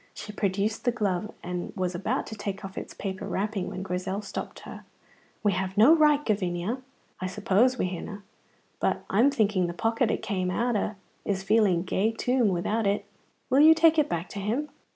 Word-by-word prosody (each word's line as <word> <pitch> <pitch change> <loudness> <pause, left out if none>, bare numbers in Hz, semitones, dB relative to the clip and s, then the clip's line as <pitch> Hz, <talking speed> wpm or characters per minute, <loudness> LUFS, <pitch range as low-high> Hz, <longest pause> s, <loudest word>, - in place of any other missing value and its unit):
She 210 - -7
produced 205 +2 -1
the 245 - +2
glove, 205 -3 -1
and 180 0 -4
was 185 -2 -1
about 205 +9 -1
to 220 - -7
take 200 -2 -5
off 195 - -8
its - - -6
paper 190 -2 -5
wrapping 205 -1 -2
when 185 - -5
Grizel 190 +2 -3
stopped - - -6
her. - - -10 0.6
"We 205 - +4
have 190 +1 -2
no 250 +10 +8
right, 300 -2 +4
Gavinia." 200 +3 -1 0.4
"I 185 - -2
suppose 210 +6 +2
we - - 0
hinna, 195 +3 -6 0.6
and - - +1
I'm 230 +8 +5
thinking 210 -8 +1
the 170 - -4
pocket 225 +4 +1
it - - -1
came 185 -3 -1
out 235 +5 0
o' 210 +1 -1 0.3
is 190 -2 -2
feeling 195 -4 +3
gey 195 +4 +1
toom 245 0 +1
without 200 +4 0
it. 200 +1 0 0.5
Will 265 - +5
you 320 +1 +8
take 325 0 +5
it 295 - +2
back 170 +1 -2
to 200 - -6
him?" 235 +10 -1
205 Hz, 195 wpm, -27 LUFS, 185-230 Hz, 0.6 s, no